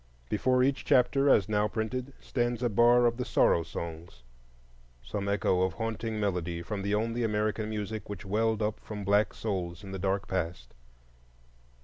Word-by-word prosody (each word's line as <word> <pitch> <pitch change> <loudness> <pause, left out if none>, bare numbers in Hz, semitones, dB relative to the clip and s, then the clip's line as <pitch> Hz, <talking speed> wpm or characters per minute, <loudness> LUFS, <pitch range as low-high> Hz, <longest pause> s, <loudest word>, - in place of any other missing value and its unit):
Before 125 +4 +2
each 135 +1 +1
chapter, 135 +2 +3
as 100 -8 +5
now 105 0 +2
printed, 120 +5 -3
stands 120 -1 -1
a 120 - +2
bar 120 +3 +5
of 120 0 +2
the 125 - -1
Sorrow 85 - +3
Songs,—some 60 -2 -9
echo 95 -2 +2
of 95 -2 +1
haunting 110 +2 -3
melody 90 -4 -2
from 100 +2 -4
the 100 +1 0
only 115 +3 -1
American 105 0 0
music 105 0 -4
which 105 0 -7
welled 110 +2 +1
up 105 +1 -1
from 105 -2 -7
black 100 +2 +3
souls 90 -4 -4
in 95 - -8
the 95 - -5
dark 95 +1 -1
past. 85 -9 -3
105 Hz, 160 wpm, -29 LUFS, 90-115 Hz, -, as